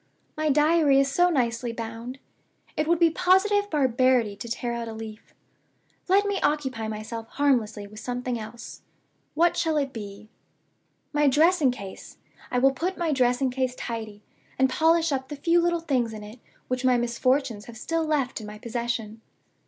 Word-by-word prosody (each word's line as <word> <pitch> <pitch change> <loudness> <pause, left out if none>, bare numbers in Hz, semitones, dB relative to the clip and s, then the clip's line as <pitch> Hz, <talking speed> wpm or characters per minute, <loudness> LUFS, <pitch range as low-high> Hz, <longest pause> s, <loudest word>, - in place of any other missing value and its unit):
My 310 0 0
Diary 300 -1 +4
is 275 0 +2
so 355 +5 +4
nicely 240 -5 0
bound 230 +2 -6 0.6
it 305 - 0
would 340 +1 +3
be 335 -1 +4
positive 390 +4 +3
barbarity 255 - +2
to 235 - -8
tear 235 +1 -3
out 235 -1 -4
a 225 - -6
leaf. 220 -1 -10 0.7
Let 395 +2 +4
me 405 -1 -1
occupy 265 -7 -1
myself 220 +1 -6
harmlessly 235 -8 0
with 210 +1 -11
something 245 +1 -3
else. 220 +2 -9 0.5
What 340 +2 +3
shall 320 -2 +1
it 275 -2 -1
be? 205 -1 -8 0.9
My 295 0 +3
dressing 310 +1 +4
case 200 -6 -8 0.3
I 250 - -1
will 270 +2 +5
put 360 +7 -2
my 340 -2 0
dressing 255 -1 +2
case 255 0 -1
tidy, 220 -4 -6 0.3
and 265 0 +3
polish 325 +2 +3
up 265 -1 -2
the 295 - -5
few 335 +4 +2
little 345 0 +1
things 255 -8 0
in 215 -1 -8
it 215 +4 -11 0.3
which 255 0 -2
my 255 -1 +4
misfortunes 240 -1 0
have 235 -1 -11
still 330 +7 -1
left 280 -6 -1
in 210 - -8
my 210 0 -8
possession. 230 -1 -4
255 Hz, 170 wpm, -26 LUFS, 230-305 Hz, 0.9 s, will